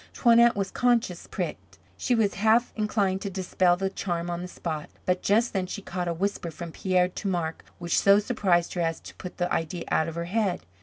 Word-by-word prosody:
Toinette 235 -1 +5
was 195 -1 -2
conscious 235 -8 +1
pricked. - - -5 0.2
She 250 - 0
was 215 -3 +2
half 220 +4 +3
inclined 200 -3 0
to 200 - -3
dispel 185 -1 +1
the 190 +1 -1
charm 175 -3 -3
on 170 0 -3
the 180 - -5
spot. 160 -4 -5 0.2
But 180 0 +1
just 225 +4 +2
then 190 -2 -1
she 200 +2 -6
caught 180 -2 -3
a - - 0
whisper 195 -1 -2
from 165 +1 -7
Pierre 180 +1 +1
to 195 - -5
Marc 170 -4 -2
which 170 -1 +1
so 200 0 +6
surprised 200 -6 +1
her 175 - -1
as 165 -1 -1
to - - -11
put 180 - -9
the 175 0 -1
idea 165 +1 -2
out 160 - +2
of 165 - -5
her 170 0 -3
head. 190 -1 0
185 Hz, 215 wpm, -27 LUFS, 175-205 Hz, 0.2 s, so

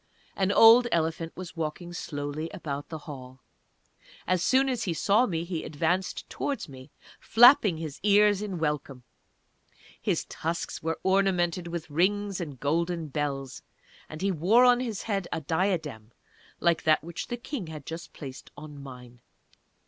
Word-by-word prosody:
An 195 0 +1
old 230 +3 +8
elephant 165 0 -1
was 185 -2 -8
walking 165 +2 -4
slowly 145 -1 -4
about 145 -1 -5
the 160 - -5
Hall. 130 -3 -10 0.8
As 185 -1 +1
soon 265 +6 +3
as 245 -3 -1
he 170 -4 -1
saw 210 +9 +3
me 165 -3 -2
he 170 -2 -4
advanced 170 +5 -1
towards 280 -8 -3
me, 130 0 -12 0.3
flapping 230 - +6
his 155 -3 -6
ears 205 0 +4
in 200 -4 -4
welcome. 150 -5 -3 1.0
His - - 0
tusks 165 +1 -4
were 160 0 -2
ornamented 185 -3 +1
with 170 -1 -5
rings 195 +4 0
and 145 -6 -7
golden 165 +3 -1
bells, 135 -2 -3 0.5
and 155 +4 -7
he 200 - +2
wore 195 +9 +4
on 245 -1 +5
his 230 -5 -4
head 195 -5 -2
a - - -1
diadem 160 - -2 0.5
like 170 -2 +2
that 155 -1 +3
which 170 0 -6
the 240 - -4
King 240 - -6
had 155 -3 -9
just 165 +1 -7
placed 135 -3 -9
on 145 -1 -10
mine. 125 -3 -12
170 Hz, 155 wpm, -27 LUFS, 150-195 Hz, 1.0 s, old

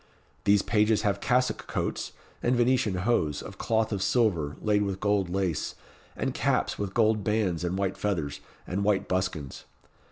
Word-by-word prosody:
These 100 -1 +4
pages 105 0 +2
have 100 -1 0
cassock 125 +1 +1
coats, - - -3 0.3
and 125 +1 +2
Venetian 120 -4 +2
hose, 80 -12 +1
of - - -10
cloth 110 -1 +1
of 100 -3 -1
silver, 90 - +1
laid 105 -1 +2
with 100 -2 -2
gold 100 -3 +1
lace, 90 -4 -1 0.4
and - - -2
caps - - 0
with 100 -1 -3
gold 110 -2 +3
bands 95 -5 0
and 90 +1 -1
white 95 -1 -1
feathers, 80 -8 -2 0.3
and 95 +3 -2
white 100 -1 +1
buskins. 90 -7 -2
100 Hz, 160 wpm, -28 LUFS, 90-110 Hz, 0.4 s, These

